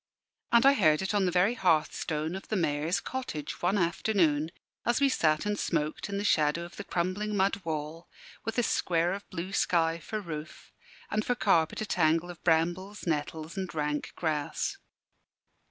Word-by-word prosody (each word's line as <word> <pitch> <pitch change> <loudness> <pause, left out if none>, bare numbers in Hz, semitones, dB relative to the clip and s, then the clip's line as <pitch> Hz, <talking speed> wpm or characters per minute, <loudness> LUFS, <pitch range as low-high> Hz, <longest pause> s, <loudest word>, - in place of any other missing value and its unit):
And 235 +2 +5
I 275 - +8
heard 155 - +3
it 190 - -1
on 205 -2 +2
the 180 - +1
very 185 +6 +3
hearthstone 160 -3 0
of 190 - -8
the 215 - -1
Mayor's 155 0 +1
cottage, 255 - -5
one 185 +4 +2
afternoon, 170 -4 +2 0.3
as 240 +1 +2
we 280 -1 +4
sat 155 -8 +2
and 210 -1 -1
smoked 155 +3 -1
in 200 - -2
the 200 - -2
shadow 155 -4 +2
of 175 - -11
the 205 - -5
crumbling 200 +4 -1
mud 195 +1 +2
wall, 160 +1 -4 0.3
with 225 +1 -4
a 245 - +3
square 175 -4 +1
of 200 +1 -7
blue 185 +1 -5
sky 165 -3 +2
for 215 +6 -4
roof, 155 -5 -8 0.4
and 215 - +1
for 245 - 0
carpet 170 -8 +2
a - - -1
tangle 165 -2 +2
of 170 - -14
brambles, 175 +5 +1
nettles, 155 +1 -2
and 185 -4 -4
rank 150 -1 -2
grass. 155 -3 -2
175 Hz, 175 wpm, -29 LUFS, 155-200 Hz, 0.4 s, I